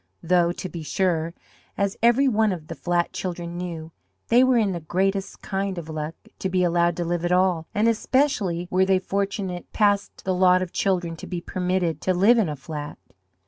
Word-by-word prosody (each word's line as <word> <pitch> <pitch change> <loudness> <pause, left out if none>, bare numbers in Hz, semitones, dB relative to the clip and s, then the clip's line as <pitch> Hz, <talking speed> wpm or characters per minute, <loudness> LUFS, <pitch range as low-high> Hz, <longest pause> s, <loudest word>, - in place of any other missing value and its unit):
Though, 175 0 +3
to 185 - -6
be 170 -2 -7
sure 170 0 -1 0.4
as 200 0 0
every 240 +4 +4
one 220 -3 +2
of 160 -4 -6
the - - -3
flat 175 -1 -1
children 175 -2 -4
knew 170 -2 -6 0.4
they 245 +2 +6
were 255 -1 +4
in 210 -4 +2
the 175 - -3
greatest 190 +4 -2
kind 195 -1 -2
of 165 -2 -6
luck 155 0 -4 0.2
to 190 - -2
be 185 0 +1
allowed 170 -1 +2
to 175 - -1
live 175 0 -1
at 175 - 0
all, 180 -3 +2
and 210 +2 +3
especially 220 -7 +1
were 185 +1 +3
they 190 0 +3
fortunate 195 -1 -3
past 205 -2 +1
the 190 - +1
lot 185 0 +4
of 175 - -8
children 175 -4 0
to - - -9
be 180 - -3
permitted 180 -3 -1
to 185 - +1
live 215 +7 +5
in 200 -7 +1
a 150 - -3
flat. 150 +1 -7
180 Hz, 200 wpm, -24 LUFS, 170-195 Hz, 0.4 s, they